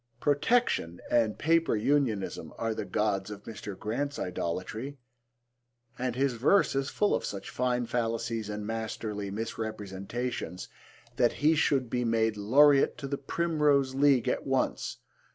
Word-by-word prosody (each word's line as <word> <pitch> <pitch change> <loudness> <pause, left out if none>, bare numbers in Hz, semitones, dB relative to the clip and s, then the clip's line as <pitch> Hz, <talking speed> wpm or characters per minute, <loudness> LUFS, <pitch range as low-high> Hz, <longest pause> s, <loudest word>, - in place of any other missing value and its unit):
Protection 145 - +1
and 115 -3 +2
Paper 165 -3 +2
Unionism 115 -3 0
are 115 0 -1
the - - -4
gods 100 -2 0
of 105 -1 -8
Mr. 105 -3 -7
Grant's 140 +7 -3
idolatry, 95 +10 -4 1.0
and 125 -1 -1
his 135 0 +1
verse 145 - +3
is 135 0 -1
full 210 - +1
of - - 0
such 100 - -5
fine 125 -1 0
fallacies 115 -2 -2
and 105 0 -4
masterly 110 -2 -4
misrepresentations 110 -1 -4 0.5
that 120 -2 +3
he 155 +2 +3
should 140 -4 +2
be 125 +2 -1
made 115 -1 +1
Laureate 135 +7 +5
to 140 - -5
the 140 0 -3
Primrose 145 -3 +1
League 135 -3 +4
at - - -1
once. - - 0
120 Hz, 135 wpm, -29 LUFS, 105-140 Hz, 1.0 s, Laureate